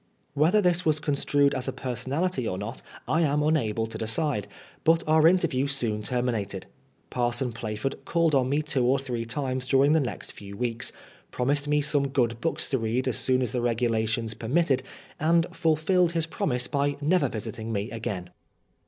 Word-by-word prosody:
Whether 160 +9 +3
this 180 0 +3
was 155 -2 +2
construed 145 -1 +2
as 130 0 -2
a - - 0
personality 130 +4 -2
or 90 - -2
not 105 +6 -6 0.3
I 160 - +2
am 150 -2 +2
unable 115 -8 +1
to 115 - -7
decide, 115 - -1 0.4
but 165 +1 +4
our 155 +1 +5
interview 165 -7 +2
soon 120 -6 -1
termi 125 +3 0
nated. 100 -3 -4 0.5
Parson 120 0 0
Plaford 110 +4 -4
called 165 -2 +1
on 130 -2 +3
me 145 +3 +1
two 140 -4 0
or 130 +3 +3
three 125 -4 -4
times 130 +1 -3
during 135 +2 +4
the 160 - +4
next 130 -5 -4
few 100 -1 -10
weeks, 120 -1 -2 0.4
promised 140 +3 0
me 150 0 +2
some 145 -1 +2
good 120 -4 0
books 165 - -1
to 135 - +1
read 115 +4 -1
as 125 - +1
soon 130 0 +2
as 120 - -2
the 125 - -1
regulations 115 -1 0
per 110 - -8
mitted, 145 0 +2 0.4
and 165 +2 +3
fulfilled 165 +2 +2
his 165 -2 +1
promise 125 -6 -1
by 140 +1 0
never 150 -1 +2
visiting 110 +1 -5
me 105 +2 -2
again. 100 -6 -5
130 Hz, 180 wpm, -26 LUFS, 115-150 Hz, 0.5 s, our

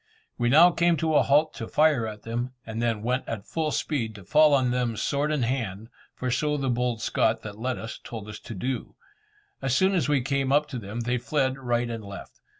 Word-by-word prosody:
We 120 0 +1
now 165 +7 +7
came 170 0 +2
to 160 0 0
a - - +6
halt 150 +3 +3
to 115 - -6
fire 150 -7 +3
at 105 -1 -8
them, 120 +3 -3
and 115 0 -4
then 115 -3 0
went 125 +2 -1
at 110 -4 -5
full 160 -2 -2
speed 120 -8 -2
to 100 - -11
fall 150 - +5
on 130 -3 +2
them 120 -3 -1
sword 145 +7 0
in 150 -5 0
hand, 115 -4 -3 0.3
for 125 -1 -2
so 150 +4 0
the 135 -2 0
bold 120 -1 -1
Scot 110 0 +1
that 105 0 -8
led 125 +2 -2
us, 110 - -7
told 110 -3 -7
us 110 0 -8
to 115 - -9
do. 125 +5 -4 0.7
As 135 -1 +1
soon 190 +1 +3
as 175 -5 +1
we 145 -3 +3
came 135 +1 0
up 150 +1 +3
to 125 - -4
them, 110 +2 -5
they 120 +1 0
fled 130 +1 0
right 120 -2 0
and 115 -2 -5
left. 100 0 -10
125 Hz, 230 wpm, -26 LUFS, 115-145 Hz, 0.7 s, now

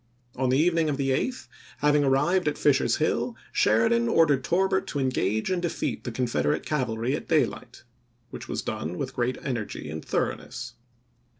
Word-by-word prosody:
On 130 0 0
the 130 - +3
evening 165 0 +2
of 140 - -1
the 135 -1 0
8th, 195 - -1 0.3
having 150 0 +3
arrived 150 +7 +2
at 150 - 0
Fisher's 145 -3 +3
Hill, - - 0 0.2
Sheridan 115 +1 +3
ordered 145 -5 +3
Torbert 190 +4 +1
to 145 - -3
engage 110 - 0
and 180 -1 0
defeat 175 -2 -3
the 120 - -3
Confed 115 - -1
erate 75 - 0
cavalry 125 -3 -1
at - - -7
daylight, 155 -6 -1 0.5
which - - -8
was - - -3
done 85 +4 -4
with 130 -1 -4
great 125 0 -1
energy 115 - -4
and 80 0 -6
thoroughness. - - -3
135 Hz, 170 wpm, -26 LUFS, 115-150 Hz, 0.5 s, the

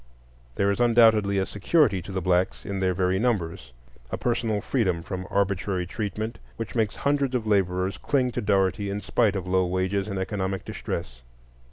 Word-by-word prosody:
There 100 0 +2
is 100 - -2
undoubtedly 110 -4 +5
a 95 - +1
security 105 - +2
to 90 - -9
the 95 -2 -3
blacks 90 +1 +1
in 100 -2 -3
their 95 -1 +1
very 95 +1 +1
numbers,—a 65 - -4
personal 115 -3 0
freedom 95 -8 0
from 95 +1 -5
arbitrary 100 -2 0
treatment, 110 +4 -4 0.2
which 115 - -5
makes 110 -3 0
hundreds 140 -2 0
of 120 -3 -1
laborers 95 -2 +1
cling 130 -3 +1
to 120 - -3
Dougherty 100 -1 +1
in 100 +1 -3
spite 105 -3 +1
of 95 -2 -3
low 95 0 +2
wages 95 +2 -1
and 100 -2 -3
economic 95 -1 -2
distress. 60 0 -5
100 Hz, 170 wpm, -26 LUFS, 95-110 Hz, 0.2 s, undoubtedly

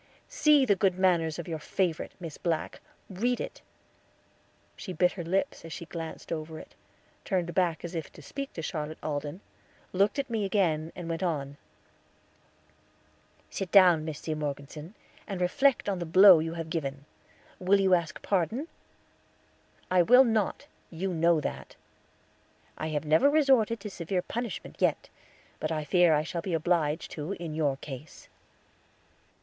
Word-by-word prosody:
"See 300 - +4
the 205 -5 +3
good 190 -2 +1
manners 170 -4 +2
of 170 - -6
your 160 -2 -4
favorite, 170 +1 -2
Miss 165 -4 -7
Black; 165 -3 -2 0.3
read 240 +6 -1
it." - - -6 1.1
She 185 - -7
bit 180 +2 +3
her 175 - -6
lips 185 +4 -1
as 165 - -9
she 170 - -6
glanced 165 -1 -7
over 160 -1 -4
it, - - -12 0.5
turned 175 -4 -1
back 175 -3 0
as 175 - -7
if 160 -4 -5
to - - -13
speak 275 - -6
to 165 - -6
Charlotte 155 -2 -4
Alden, 145 +4 -4 0.5
looked 200 +5 +2
at 280 - -1
me 225 -3 -1
again, 170 -6 0
and 175 -2 -7
went 165 -1 -3
on: 145 -6 -2 2.0
"Sit 195 -2 -4
down, 180 -5 +6
Miss 155 -2 -5
C. 160 - -4
Morgeson, 150 +4 -6 0.3
and 195 -4 -4
reflect 245 +10 +2
on 195 -3 -1
the 170 - -3
blow 185 +1 +8
you 165 +1 -3
have 165 -1 -6
given. 140 -4 -3 0.5
Will 190 +2 +3
you 190 -1 +3
ask 170 -3 0
pardon?" 210 - -1 1.2
"I 185 -1 +5
will 250 +9 +7
not; 220 -5 0 0.2
you 180 +3 -3
know 165 0 +3
that." - - -6 1.0
"I 155 - -4
have 155 -1 -2
never 160 - +5
resorted 265 -7 +3
to 210 - -6
severe 180 +1 -2
punishment 235 +1 -5
yet; - - +1 0.5
but - - -2
I 155 -1 -1
fear 170 +1 +4
I 150 - +1
shall 170 +1 -4
be 175 -1 -2
obliged 160 -1 0
to 155 +5 -4
in 170 -4 -6
your 145 -3 0
case." 135 +2 -10
170 Hz, 160 wpm, -28 LUFS, 155-195 Hz, 2.0 s, blow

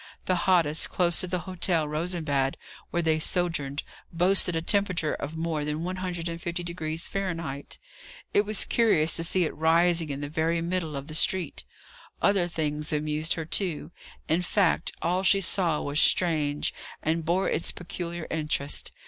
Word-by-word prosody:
The 185 - +2 0.2
hottest, 165 -4 +3
close 175 -2 +2
to 185 - -2
the 180 0 -2
Hotel 175 -3 0
Rosenbad, 150 -4 -1 0.3
where 175 - -1
they 160 -1 +2
sojourned, 155 -5 -1 0.3
boasted 180 +1 +3
a 165 - 0
temperature 185 -5 +1
of 150 +3 -5
more 160 -2 -1
than 150 +2 -2
150° 170 -2 -3
Fahrenheit; 165 -8 -4 0.6
it - - +5
was 215 0 +1
curious 190 -9 +3
to 165 - -2
see 180 +2 +2
it 160 - -2
rising 165 +1 +3
in 140 -1 -3
the 145 - -3
very 160 +3 0
middle 170 -2 -2
of 140 0 -5
the 155 - -8
street. 170 0 +2 0.5
Other 195 -3 +3
things 150 -2 -3
amused 150 +1 0
her, 165 - -4
too; 165 -2 -1 0.4
in 165 +3 +2
fact, 180 -2 +1
all 180 +3 +1
she 195 +1 +4
saw 175 -4 +1
was 145 +1 +2
strange, 150 -5 +3 0.3
and 160 +1 0
bore 175 +4 +1
its - - 0
peculiar 175 -1 -5
interest. 150 -2 -1
165 Hz, 155 wpm, -27 LUFS, 155-180 Hz, 0.6 s, it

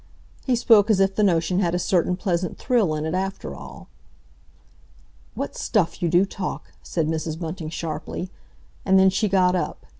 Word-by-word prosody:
He 255 - +3
spoke 225 -3 +5
as 210 -3 +3
if 195 0 +3
the 215 - 0
notion 180 -2 +2
had 175 -3 +1
a - - +2
certain 180 0 +1
pleasant 180 -3 -2
thrill 225 - +1
in 155 0 -3
it 160 - -2
after 190 +1 -3
all. - - -11 1.5
"What - - -4
stuff 170 - 0
you 170 - +1
do 175 +3 +4
talk!" 195 -1 -6
said 165 -3 -2
Mrs. 160 0 -3
Bunting 165 -1 -5
sharply. 165 +3 -5 0.5
And 190 0 +4
then 190 0 +5
she 210 +2 0
got 185 -1 +3
up. 180 - -3
180 Hz, 175 wpm, -23 LUFS, 165-195 Hz, 1.5 s, spoke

